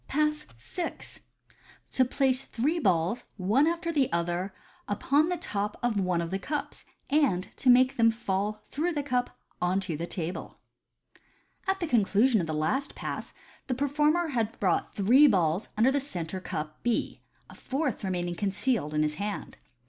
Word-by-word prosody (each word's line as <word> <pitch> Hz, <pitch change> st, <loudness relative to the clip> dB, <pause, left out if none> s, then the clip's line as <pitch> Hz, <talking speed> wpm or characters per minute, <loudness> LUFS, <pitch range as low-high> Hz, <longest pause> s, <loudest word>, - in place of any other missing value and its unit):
Pass 300 Hz, +1 st, 0 dB
VI. 330 Hz, -, -4 dB, 1.0 s
To 260 Hz, -, +4 dB
Place 260 Hz, 0 st, +2 dB
three 290 Hz, +8 st, -1 dB
Balls 185 Hz, -, +1 dB
one 215 Hz, +11 st, +3 dB
after 335 Hz, 0 st, -1 dB
the 280 Hz, -4 st, +2 dB
other 175 Hz, +3 st, -1 dB, 0.4 s
upon 280 Hz, +9 st, +2 dB
the 360 Hz, 0 st, -1 dB
top 210 Hz, -9 st, -3 dB
of 235 Hz, -4 st, +1 dB
one 180 Hz, -3 st, +1 dB
of 165 Hz, 0 st, -4 dB
the 195 Hz, -, -1 dB
Cups, 295 Hz, +8 st, -4 dB, 0.3 s
and 270 Hz, -12 st, +2 dB
to 260 Hz, -, +2 dB
make 255 Hz, +1 st, +5 dB
them 230 Hz, -1 st, +5 dB
fall 210 Hz, -1 st, -2 dB
through 335 Hz, +5 st, 0 dB
the 290 Hz, -2 st, -1 dB
Cup 250 Hz, -3 st, -1 dB, 0.2 s
on 180 Hz, +2 st, +2 dB
to 180 Hz, -4 st, -3 dB
the 170 Hz, +3 st, -4 dB
Table. 175 Hz, -1 st, -5 dB, 0.5 s
— -, -, -32 dB
At 385 Hz, 0 st, +1 dB
the -, -, +1 dB
conclusion 225 Hz, -1 st, +3 dB
of 165 Hz, -, -3 dB
the 155 Hz, -, -2 dB
last 260 Hz, -, -1 dB
Pass -, -, -5 dB, 0.3 s
the 255 Hz, -, 0 dB
performer 300 Hz, +5 st, +2 dB
had 230 Hz, -5 st, -1 dB
brought 185 Hz, -4 st, 0 dB
three 245 Hz, +9 st, +6 dB
balls 180 Hz, -, +2 dB
under 235 Hz, +5 st, +5 dB
the 285 Hz, -, +1 dB
centre 185 Hz, -, -5 dB
cup 155 Hz, -3 st, -5 dB
B, 240 Hz, -2 st, -1 dB, 0.3 s
a -, -, -13 dB
fourth 270 Hz, -4 st, -2 dB
remaining 175 Hz, -2 st, -1 dB
concealed 195 Hz, -, -1 dB
in 150 Hz, -, +3 dB
his 150 Hz, 0 st, 0 dB
hand. 205 Hz, 0 st, -4 dB
225 Hz, 170 wpm, -28 LUFS, 185-280 Hz, 1.0 s, three